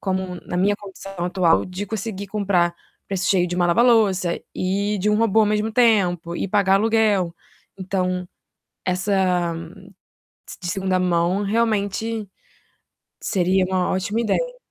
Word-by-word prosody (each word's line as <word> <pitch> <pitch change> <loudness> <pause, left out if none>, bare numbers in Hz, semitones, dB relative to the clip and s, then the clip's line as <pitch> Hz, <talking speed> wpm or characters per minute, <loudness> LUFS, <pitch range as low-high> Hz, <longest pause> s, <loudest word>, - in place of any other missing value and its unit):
como 190 -2 -2
na 180 - -3
minha 195 +3 +2
condição 195 -1 -10
atual 175 -2 +2
de 185 +2 -6
conseguir 205 -1 -4
comprar 190 -4 +1 0.3
preço 190 -1 -1
cheio 180 -2 +3
de 175 - -4
uma 175 -1 +2
lava-louça 195 -3 +3
e 200 +3 -1
de 200 +3 0
um 210 - +3
robô 225 -1 +3
ao 215 - +4
mesmo 210 +1 0
tempo, 185 -8 +2
e 195 - -3
pagar 195 -1 +3
aluguel". 210 -4 +2 0.5
Então, 185 -1 -2 0.6
essa, 185 -2 +1 0.9
de - - -9
de 175 - -4
2ª 190 0 0
mão, 180 +2 +1
realmente, 215 0 -1 0.9
seria 185 -1 +1
uma 185 -1 0
ótima 195 +4 -1
ideia. - - -1
190 Hz, 140 wpm, -22 LUFS, 180-210 Hz, 0.9 s, ao